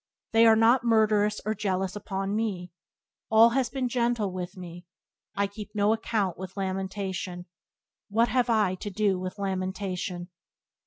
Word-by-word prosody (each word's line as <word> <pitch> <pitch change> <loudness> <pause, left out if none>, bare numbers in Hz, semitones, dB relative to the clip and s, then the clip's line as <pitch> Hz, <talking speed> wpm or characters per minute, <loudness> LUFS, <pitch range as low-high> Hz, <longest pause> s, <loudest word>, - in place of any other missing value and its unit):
They 225 0 +6
are 220 - +7
not 230 +3 +4
murderous 215 -2 +3
or 215 - 0
jealous 190 -2 -2
upon 195 0 -3
me; 195 -5 -2 0.6
All 225 +1 +7
has 255 0 0
been 260 +1 -2
gentle 235 -4 0
with 180 +1 -6
me, 175 -1 -10 0.5
I 200 - +1
keep 210 +1 -9
no 205 +1 +3
account 215 -5 -1
with 190 +1 -8
lamentation; 190 -2 -3 0.6
What 230 +3 +2
have 245 +1 +1
I 215 -5 +3
to 195 +3 -6
do 200 -1 +1
with 185 +2 -5
lamentation?" 185 -2 -3
200 Hz, 150 wpm, -27 LUFS, 185-225 Hz, 0.6 s, are